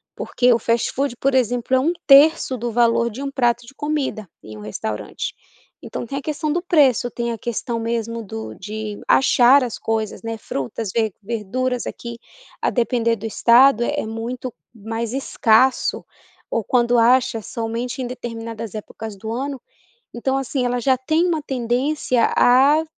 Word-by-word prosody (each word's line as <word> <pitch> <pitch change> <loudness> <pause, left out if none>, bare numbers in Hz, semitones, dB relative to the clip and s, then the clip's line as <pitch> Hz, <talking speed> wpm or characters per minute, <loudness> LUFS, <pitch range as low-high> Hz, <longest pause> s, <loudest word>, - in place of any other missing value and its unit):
Porque 250 0 +1
o 230 - +1
fast-food, 240 +3 0
por 275 +2 +1
exemplo, 245 +1 +1
é - - +4
1/3 290 -2 +4
do 235 0 -3
valor 235 0 +2
de 240 +5 -8
um 275 - -3
prato 240 -3 +1
de 270 - -14
comida, 285 -8 -3 0.2
em 110 0 -10
um 105 - -10
restaurante. 105 0 -5 0.5
Então - - -6
tem 275 +4 -5
a 280 - -3
questão 305 +1 -2
do 345 +3 0
preço, 275 - +3
tem 235 0 -3
a 230 - -4
questão 235 +1 -3
mesmo 230 0 -3
do 110 - -7
de 215 - -6
achar 265 +1 +5
as 240 -3 -4
coisas 220 -1 -3
né, 225 0 -3
frutas, 185 - -4
ver 220 -2 0
verduras 235 +4 -2
aqui, 235 0 -7 0.4
a - - +2
depender 235 -1 +1
do 220 0 -9
estado 240 +2 +5
é 290 +3 -1
muito 235 +3 -5 0.2
mais 225 +1 -5
escasso, 260 -1 +2 0.5
ou 230 - -1
quando 240 +1 +2
acha 235 -1 +3
somente 230 +4 -4
em 250 - -3
determinadas 230 -3 -6
épocas 215 0 -7
do 220 +3 -7
ano. 265 +2 -4 0.5
Então 265 +3 -1
assim 265 -1 -1
ela 245 0 0
já 255 +1 +2
tem 315 +6 +1
uma 330 -3 0
tendência 255 0 0
a 275 +6 +5
240 Hz, 160 wpm, -21 LUFS, 225-265 Hz, 0.5 s, achar